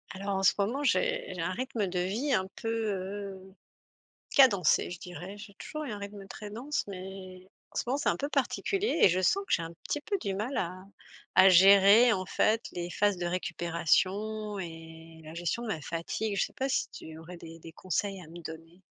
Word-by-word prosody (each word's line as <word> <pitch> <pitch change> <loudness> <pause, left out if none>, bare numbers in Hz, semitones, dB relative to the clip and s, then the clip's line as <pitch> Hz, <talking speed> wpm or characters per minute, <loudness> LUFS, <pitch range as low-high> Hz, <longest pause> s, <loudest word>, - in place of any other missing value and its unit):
Alors 200 +1 -2
en 195 - -1
ce - - +6
moment, 230 +8 0
j'ai - - +1
j'ai - - -5
un - - -1
rythme 255 -5 -2
de 180 0 -2
vie 215 +11 -1
un 190 -4 +1
peu, - - -6
heu, 195 -3 -4 0.8
cadencé, 200 - +5
je 175 - -6
dirais. 180 +3 -8
J'ai 205 0 -11
toujours 305 +9 -6
eu 255 - -5
un 205 - -5
rythme 200 -1 -8
très 210 +2 -8
dense, 270 +7 -2
mais, 185 -1 -9 0.2
en - - -13
ce - - +1
moment, 255 +3 +1
c'est - - 0
un - - +2
peu 285 - -3
particulier 355 - 0
et - - +9
je 180 +2 +1
sens 390 - +2
que - - -4
j'ai 170 - +3
un 165 0 -6
petit 295 - -1
peu 400 +7 -1
du 195 -3 -2
mal 220 +8 -3
à 185 +1 -3 0.5
à 185 +1 +8
gérer 200 +6 +8
en 185 -3 -1
fait, 220 +4 +1
les 175 -1 -4
phases 205 0 +1
de 175 - -2
récupération 185 +5 0
et 165 -2 -9
la 155 +1 -10
gestion 175 +7 -2
de 235 - -5
ma 165 -7 -2
fatigue. 170 +7 -3
Je 195 - +3
sais - - -16
pas, 265 - -1
si - - 0
tu 160 0 -10
aurais 170 +2 -10
des 165 -1 -11
des 165 0 -11
conseils 190 +3 -2
à - - -12
me 170 +2 -10
donner? 165 +2 -10
195 Hz, 215 wpm, -30 LUFS, 175-220 Hz, 0.8 s, et